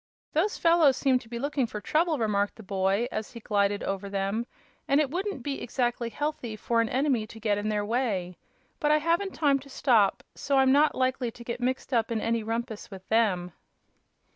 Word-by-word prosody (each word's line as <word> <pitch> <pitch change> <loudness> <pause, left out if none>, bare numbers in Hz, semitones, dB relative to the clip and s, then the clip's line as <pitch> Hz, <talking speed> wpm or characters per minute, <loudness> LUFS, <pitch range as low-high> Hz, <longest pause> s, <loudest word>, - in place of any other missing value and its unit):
"Those 380 +8 +1
fellows 330 -6 +4
seem 260 -2 +3
to 235 -3 -16
be 235 - -5
looking 280 0 -1
for 210 - -6
trouble," 315 +7 +1
remarked 205 -3 0
the 220 - -12
boy, 195 +3 0
as 215 - -4
he 235 - -8
glided 205 -2 0
over 195 0 -3
them, 200 +4 -2 0.4
"and 275 - +4
it 290 -3 +1
wouldn't 370 - -3
be 280 0 -3
exactly 240 -1 -1
healthy 255 -3 -3
for 230 +2 +1
an 230 - -1
enemy 260 -5 +1
to 225 - -11
get 210 -2 0
in 210 +1 -2
their 210 -1 0
way. 205 -6 -1 0.4
But 295 - +1
I 305 - +6
haven't 340 +5 0
time 280 -3 +3
to 275 +1 -14
stop, 235 -7 +2
so 280 -1 0
I'm 265 -1 +5
not 295 +3 +4
likely 255 -1 0
to 235 +1 -11
get 235 +1 -4
mixed 260 +2 -2
up 230 -2 +2
in 230 -2 -1
any 230 +1 0
rumpus 225 0 -4
with 190 -2 -11
them." 195 -6 +2
235 Hz, 205 wpm, -27 LUFS, 210-275 Hz, 0.4 s, I